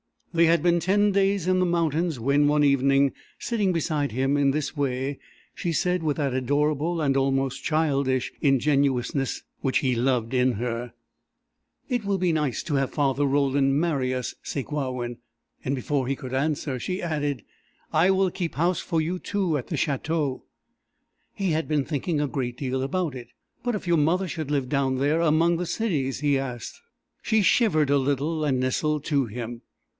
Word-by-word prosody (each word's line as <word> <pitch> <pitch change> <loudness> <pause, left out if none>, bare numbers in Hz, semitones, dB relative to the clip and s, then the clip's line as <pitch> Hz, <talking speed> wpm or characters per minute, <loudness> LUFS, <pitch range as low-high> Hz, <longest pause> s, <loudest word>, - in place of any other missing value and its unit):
They 170 0 +5
had 165 +1 +3
been 175 -1 +3
ten 205 +4 +2
days 195 -2 +1
in 185 0 +2
the 185 - +3
mountains 165 -3 0
when, 140 +5 +3
one 150 0 +3
evening, 140 0 +3 0.3
sitting 210 -5 0
beside 150 -6 -1
him 135 +3 +1
in 140 -1 +3
this 150 +2 -2
way, 135 -1 -2 0.3
she 170 - -3
said, 180 +1 +1
with 155 -3 -1
that 140 -4 0
adorable 150 +5 0
and 140 -2 +1
almost 135 0 0
childish 140 -5 +1
ingenuousness 135 -2 +1 0.2
which 135 -1 +1
he 130 -2 +1
loved 120 -1 0
in 125 0 +3
her: 120 +2 -4 0.9
"It 245 -4 -1
will 200 -1 +1
be 180 -2 +1
nice 150 -6 -1
to 155 -4 -2
have 135 -1 0
Father 145 -1 +1
Roland 140 0 +2
marry 145 -6 0
us, 125 -1 -3
Sakewawin!" 130 -4 -3 0.5
And 135 - 0
before 135 0 -1
he 135 - 0
could 130 -1 -8
answer, 140 -1 -1
she 185 +9 -3
added: 145 -7 -2 0.5
"I 165 +4 +4
will 190 -1 +3
keep 175 -3 -4
house 170 +5 +1
for 165 -3 -1
you 175 +4 -2
two 185 -7 -1
at 130 - -6
the 160 - -3
Château." 145 -1 -1 0.9
He 195 -3 0
had 160 +1 0
been 150 -2 +1
thinking 150 +1 -1
a 145 - 0
great 125 -3 -3
deal 130 -1 -2
about 155 +3 -1
it. 125 -2 -8 0.4
"But 245 -2 0
if 205 - -5
your 170 -1 +3
mother 175 +5 +1
should 155 -4 -4
live 140 -4 -1
down 135 -2 +1
there 145 +4 +2
among 165 +1 +3
the 180 - -2
cities?" 160 - -1
he 145 -2 +2
asked. 125 -4 -6 0.4
She 220 -1 +2
shivered 170 - +3
a 145 - +4
little, 145 +4 -1
and 135 -3 +1
nestled 150 +3 0
to 140 -4 +1
him. 120 +1 -6
145 Hz, 180 wpm, -25 LUFS, 135-165 Hz, 0.9 s, They